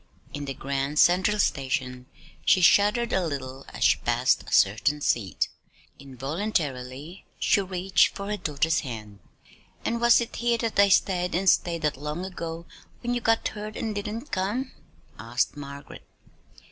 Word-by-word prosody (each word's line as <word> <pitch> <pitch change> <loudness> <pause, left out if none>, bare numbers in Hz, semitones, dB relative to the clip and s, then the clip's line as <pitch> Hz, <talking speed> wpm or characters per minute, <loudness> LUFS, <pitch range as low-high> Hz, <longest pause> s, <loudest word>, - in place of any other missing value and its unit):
In 145 0 -5
the 135 -1 -5
Grand 140 +2 -3
Central 185 +6 +4
Station 130 -7 -1 0.4
she - - +4
shuddered 210 +6 +4
a 190 - +2
little 135 -4 -5
as - - -4
she - - +4
passed - - +2
a - - -12
certain 110 +9 +3
seat. 110 -9 0 0.5
Involuntarily 140 - -4
she 200 - +3
reached 190 0 +1
for 200 - -5
her 210 +1 -2
daughter's 155 -1 0
hand. 110 -7 -7 0.7
"And 235 0 -1
was 235 -1 +6
it 235 - -4
here 235 0 +1
that 225 -3 -2
I 200 0 +6
stayed 180 -2 +2
and 190 +2 -1
stayed 170 -2 +2
that 150 - +2
day - - -15
long 150 +5 -4
ago 170 -3 -6 0.4
when 240 0 -1
you 240 - -1
got 225 0 +2
hurt 215 0 -7
and 220 -1 -3
didn't 210 +7 -5
come?" 210 +8 -2 0.5
asked 120 +7 -1
Margaret. 140 0 -9
170 Hz, 160 wpm, -26 LUFS, 135-205 Hz, 0.7 s, was